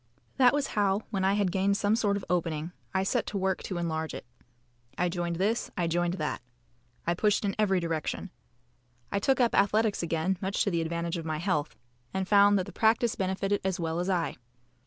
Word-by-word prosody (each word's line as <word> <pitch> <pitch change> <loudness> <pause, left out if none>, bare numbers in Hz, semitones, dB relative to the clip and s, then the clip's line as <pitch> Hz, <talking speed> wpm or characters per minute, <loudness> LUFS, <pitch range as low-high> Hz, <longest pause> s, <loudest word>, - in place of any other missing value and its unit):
That 250 -2 +6
was 290 -1 0
how, 205 0 +1
when 195 -3 -1
I 190 +1 +3
had 200 -3 +1
gained 195 +2 +2
some 205 +1 +2
sort 205 -3 +1
of 200 - -7
opening, 165 -2 -1 0.2
I 190 0 +1
set 195 - 0
to 205 - -3
work 190 -1 0
to 185 - -4
enlarge 160 -2 -2
it. - - -8 0.7
I 180 - +1
joined 175 -1 -2
this. 205 +7 0
I 175 - +1
joined 175 +1 0
that. 155 -4 -3 0.6
I 170 - +2
pushed 210 +3 +1
in 200 - -1
every 195 -3 +3
direction. 165 +2 -3 0.8
I 200 - +1
took 265 +6 +2
up 240 -2 +3
athletics 210 +1 +2
again 170 +2 -1
much 195 +1 0
to 200 - 0
the 170 -1 +1
advantage 170 +1 -2
of 165 - -5
my 155 -1 -2
health, 155 -3 -1 0.4
and 190 -1 -1
found 205 0 +6
that 185 - -1
the - - -9
practice 225 +1 +2
benefited 195 +1 -1
as 190 -2 -1
well 165 0 -1
as 180 +2 -1
I. 175 -3 0
190 Hz, 205 wpm, -29 LUFS, 170-205 Hz, 0.8 s, That